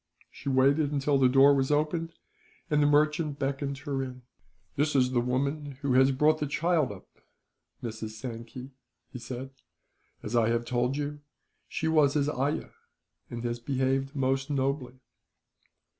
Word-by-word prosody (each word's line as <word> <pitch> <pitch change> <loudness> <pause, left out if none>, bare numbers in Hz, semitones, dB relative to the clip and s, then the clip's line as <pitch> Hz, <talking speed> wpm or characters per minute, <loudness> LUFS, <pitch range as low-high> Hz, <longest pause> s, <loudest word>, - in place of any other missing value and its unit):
She 140 - -6
waited 140 +3 +3
until 140 -1 +1
the 130 -1 +5
door 135 +2 +6
was 135 -1 +1
opened, 155 +3 0 0.6
and 150 0 +3
the 145 - +4
merchant 150 0 +2
beckoned 140 0 -2
her 140 -2 -1
in. 130 -1 -7 0.5
"This 145 +1 0
is 130 -1 +3
the 120 -2 +2
woman 140 +3 -2
who 135 -2 +1
has 130 +1 +5
brought 150 +4 +3
the 150 - -1
child 160 -3 +1
up, 100 - -11 0.8
Mrs. 110 -2 -5
Sankey," 120 +2 -7 0.4
he 125 - -6
said. 125 +2 -7 0.7
"As 105 - -4
I 115 -1 +3
have 115 0 0
told 125 +2 0
you, 145 0 -3 0.5
she 160 - -3
was 155 -3 +3
his 145 -1 +2
ayah, 140 +1 -2 0.6
and 120 0 -6
has 120 0 -2
behaved 135 +2 -1
most 135 0 0
nobly." 135 -2 -2
135 Hz, 155 wpm, -28 LUFS, 125-145 Hz, 0.8 s, door